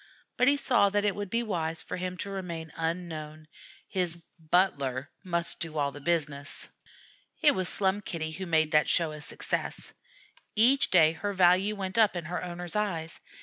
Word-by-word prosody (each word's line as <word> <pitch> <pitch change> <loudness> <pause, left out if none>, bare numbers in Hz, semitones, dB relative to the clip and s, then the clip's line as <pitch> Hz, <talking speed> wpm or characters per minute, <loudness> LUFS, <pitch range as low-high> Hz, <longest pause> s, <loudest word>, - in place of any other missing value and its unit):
But 250 - +3
he 285 +1 +5
saw 245 -7 +3
that 205 +1 0
it 200 - +1
would 205 -1 -4
be 230 +4 0
wise 165 -6 -2
for - - -5
him 180 0 -4
to 200 - -7
remain 170 -5 -5
unknown; 160 -2 -4 0.4
his 180 -3 -1 0.2
"butler" 145 -6 +1
must 170 -2 -2
do 160 -2 -4
all 140 -1 +1
the 145 - -10
business. 145 -3 -2 0.7
It 295 -2 +6
was 185 -1 -1
Slum 195 +1 +1
Kitty 160 -5 -4
who 190 +3 -6
made 155 -2 +2
that 150 - +4
show 165 -2 +2
a 150 -1 -8
success. - - -3 0.6
Each 250 +5 +6
day 160 -4 +6
her 200 +5 -4
value 190 +3 +4
went 195 +2 -2
up 215 -4 +4
in 175 -2 -4
her 180 +3 -4
owner's 175 0 -6
eyes. 170 -6 -2
175 Hz, 180 wpm, -29 LUFS, 160-195 Hz, 0.7 s, It